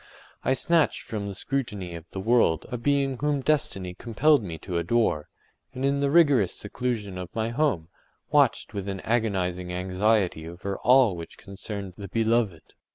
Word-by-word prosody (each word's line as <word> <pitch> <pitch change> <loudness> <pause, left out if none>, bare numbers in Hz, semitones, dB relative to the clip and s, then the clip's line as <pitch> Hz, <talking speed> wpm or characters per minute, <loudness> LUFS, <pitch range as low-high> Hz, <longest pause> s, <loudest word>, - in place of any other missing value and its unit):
I 130 - +2
snatched 165 +4 +2
from 105 -2 -4
the 100 - -5
scrutiny 105 -7 -3
of 85 -1 -8
the 95 - -6
world 110 -6 +2
a 125 - -2
being 135 -1 +1
whom 145 -1 0
destiny 100 -11 0
compelled 125 +9 +2
me 85 -6 -6
to 85 +1 -3
adore, 85 -4 +1 0.5
and 130 +2 -2
in 140 0 +2
the 140 0 +1
rigorous 140 - +4
seclusion 105 -4 -3
of 90 -1 -6
my 110 0 0
home, 115 - 0 0.4
watched - - +3
with 100 -1 -4
an 95 -2 -4
agonizing 95 -6 -1
anxiety 90 -2 0
over 95 +3 -5
all 125 -6 +5
which 85 -1 -9
concerned 100 -1 -7
the 100 - -6
beloved. 110 -5 0
105 Hz, 160 wpm, -26 LUFS, 90-130 Hz, 0.5 s, all